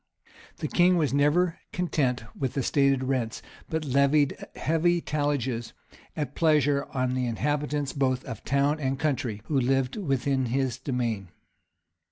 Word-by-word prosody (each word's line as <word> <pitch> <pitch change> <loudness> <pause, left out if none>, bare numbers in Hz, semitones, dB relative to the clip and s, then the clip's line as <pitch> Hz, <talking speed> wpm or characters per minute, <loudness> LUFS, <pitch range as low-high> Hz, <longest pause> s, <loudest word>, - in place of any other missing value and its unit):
The - - -3
king 180 0 +4
was 150 -5 +1
never 160 +5 +2
content 145 -9 0
with 130 -3 -3
the 135 - 0
stated 140 -1 +2
rents, 130 -4 -2 0.3
but 160 -1 -2
levied 140 +1 +3 0.2
heavy 170 +2 +2
talliages 140 -7 -2 0.4
at 145 -3 -3
pleasure 145 -3 +2
on 130 -1 0
the 130 -1 0
inhabitants 145 +3 -1
both 130 -2 0
of 115 - -7
town 140 +3 +1
and, 135 -2 -1
country 130 -8 -2
who 145 -3 +1
lived 135 - +1
within 135 - 0
his 130 0 -1
demesne. 120 -7 -2
140 Hz, 140 wpm, -27 LUFS, 130-150 Hz, 0.4 s, king